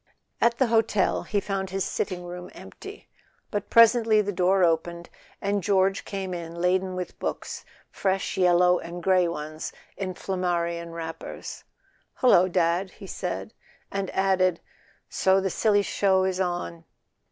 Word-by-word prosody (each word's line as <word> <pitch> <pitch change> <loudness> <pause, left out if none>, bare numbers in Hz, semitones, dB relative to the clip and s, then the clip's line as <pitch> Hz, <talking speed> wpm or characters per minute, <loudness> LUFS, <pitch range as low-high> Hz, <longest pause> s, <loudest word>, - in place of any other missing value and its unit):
At 235 0 +3
the 260 - +3
hotel 225 -3 +2
he 205 - -1
found 195 -1 -3
his 190 -1 -1
sitting 180 -3 -3
room 180 0 -7
empty; - - -11 0.4
but 205 -1 -3
presently 230 -1 +6
the 205 -1 0
door 185 0 +2
opened 170 +1 0 0.3
and 200 0 0
George 195 -1 +2
came 190 -2 -4
in 170 -1 -6
laden 185 +1 +1
with 180 -1 -6
books, - - -4 0.3
fresh 190 0 -1
yellow 180 -1 +4
and 175 +1 -8
grey 185 -1 +4
ones 155 -1 -5 0.2
in 185 -2 -4
Flammarion 170 -3 -2
wrappers. 165 -1 -7 0.5
"Hullo, 185 -8 +5
Dad," 175 +1 +1
he 195 - -13
said; 190 +3 -5 0.4
and 195 -1 -2
added: 185 -2 +2 0.5
"So 190 0 +3
the 190 -1 -1
silly 205 0 +2
show 190 -2 +2
is 190 -1 -1
on." 175 -2 -3
185 Hz, 140 wpm, -26 LUFS, 175-195 Hz, 0.5 s, presently